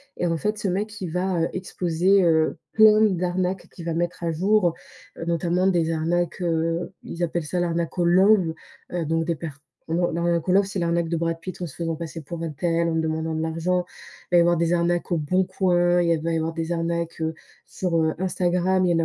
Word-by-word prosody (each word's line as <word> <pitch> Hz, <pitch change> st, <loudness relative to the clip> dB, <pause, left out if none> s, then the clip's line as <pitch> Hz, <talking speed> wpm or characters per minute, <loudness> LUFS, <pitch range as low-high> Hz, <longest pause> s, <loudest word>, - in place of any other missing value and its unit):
Et -, -, -2 dB
en 165 Hz, -1 st, 0 dB
fait, 210 Hz, +5 st, -1 dB
ce 205 Hz, -2 st, -2 dB
mec, 210 Hz, +3 st, -3 dB
il 180 Hz, -4 st, -4 dB
va, 180 Hz, 0 st, 0 dB
heu, 165 Hz, -, +1 dB
exposer, 185 Hz, +1 st, +1 dB
heu, 160 Hz, -2 st, +2 dB
plein 215 Hz, -1 st, +6 dB
d'arnaques 185 Hz, -2 st, 0 dB
qu'il 170 Hz, -, -8 dB
va 165 Hz, -, -1 dB
mettre 175 Hz, +1 st, -2 dB
à 165 Hz, -, 0 dB
jour, 185 Hz, +1 st, +2 dB, 0.4 s
heu, 165 Hz, -, -5 dB
notamment 170 Hz, +2 st, +1 dB
des 170 Hz, -3 st, +2 dB
arnaques. 170 Hz, +2 st, -1 dB
Heu, 165 Hz, 0 st, -1 dB
ils 175 Hz, -, -5 dB
appellent 170 Hz, 0 st, -1 dB
ça 180 Hz, +4 st, -2 dB
l'arnaque 170 Hz, 0 st, -1 dB
au 175 Hz, -, +2 dB
love. 185 Hz, -1 st, +4 dB, 0.4 s
Heu, 175 Hz, -1 st, -1 dB
donc 165 Hz, +1 st, 0 dB
des 170 Hz, 0 st, 0 dB
per 165 Hz, +2 st, -6 dB, 0.4 s
heu, 165 Hz, -, 0 dB, 0.2 s
l'arnaque 170 Hz, 0 st, 0 dB
au 180 Hz, -, +3 dB
love, 200 Hz, +1 st, +5 dB
c'est 195 Hz, -1 st, -4 dB
l'arnaque 170 Hz, -1 st, 0 dB
de 170 Hz, -, 0 dB
Brad 165 Hz, 0 st, -1 dB
Pitt 185 Hz, +1 st, -7 dB
en 175 Hz, -, -2 dB
se 145 Hz, -, -12 dB
faisant 165 Hz, -1 st, -2 dB
passer 165 Hz, 0 st, -6 dB
pour 165 Hz, +3 st, -7 dB
untel, 165 Hz, +2 st, 0 dB
en 165 Hz, -, -1 dB
demandant 160 Hz, 0 st, -1 dB
de 160 Hz, -, -1 dB
l'argent. 165 Hz, +3 st, 0 dB, 0.5 s
Il -, -, +3 dB
va -, -, +8 dB
y -, -, +8 dB
avoir 175 Hz, 0 st, +4 dB
des 170 Hz, 0 st, +1 dB
arnaques, 175 Hz, +1 st, 0 dB
heu, -, -, +3 dB
au -, -, 0 dB
Bon 180 Hz, +5 st, +1 dB
Coin. 175 Hz, -2 st, +2 dB
Il 175 Hz, -, +1 dB
y -, -, +5 dB
a 165 Hz, -, 0 dB
va 165 Hz, +1 st, -1 dB
y 165 Hz, -, +1 dB
avoir 160 Hz, +1 st, -2 dB
des 165 Hz, +1 st, -3 dB
arnaques, 170 Hz, 0 st, -2 dB
heu, 160 Hz, 0 st, -1 dB, 0.3 s
sur, 180 Hz, -3 st, -2 dB
heu, 160 Hz, 0 st, +1 dB
Instagram. 185 Hz, 0 st, +1 dB
Il 175 Hz, -, +2 dB
y -, -, +3 dB
en 165 Hz, -, +2 dB
170 Hz, 240 wpm, -24 LUFS, 165-180 Hz, 0.5 s, va